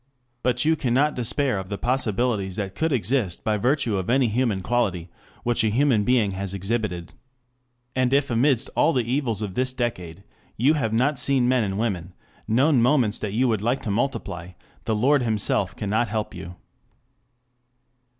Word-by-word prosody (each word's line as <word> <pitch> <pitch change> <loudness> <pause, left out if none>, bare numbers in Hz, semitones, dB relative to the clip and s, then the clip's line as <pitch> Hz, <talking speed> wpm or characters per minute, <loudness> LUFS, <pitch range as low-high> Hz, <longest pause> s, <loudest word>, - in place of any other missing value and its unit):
But 125 +2 +1
you 160 +1 +4
cannot 140 +2 +1
despair 125 -1 0
of 95 0 -7
the 100 - -3
possibilities 115 -5 -1
that 95 -2 -4
could 160 +7 -1
exist 115 -6 0
by 110 -1 +1
virtue 125 -1 +1
of 95 +2 -3
any 130 -1 +3
human 110 -4 0
quality 95 -7 -1 0.3
which 120 -1 +2
a 110 - +2
human 120 -1 +2
being 115 -3 +2
has 95 0 -4
exhibited. 95 -3 -3 0.8
And 130 -1 +1
if 140 -1 +2
amidst 125 +1 +2
all 165 - +3
the 125 - +1
evils 120 -3 -1
of 100 -3 -5
this 130 +2 -1
decade, 100 -8 -4 0.3
you 135 +7 +4
have 125 -8 -1
not 130 +6 +1
seen 135 -3 +2
men 125 -2 +3
and 95 -1 -2
women, 95 -6 -3 0.3
known 130 +3 +3
moments 120 -4 +2
that 105 -2 -4
you 125 +4 +2
would 110 -3 0
like 120 +5 -1
to 105 - -2
multiply, 100 -6 -3 0.3
the 110 - 0
Lord 135 +6 +3
himself 105 -4 0
cannot 110 +3 0
help 110 0 -3
you. 90 +2 -8
115 Hz, 170 wpm, -24 LUFS, 100-130 Hz, 0.8 s, you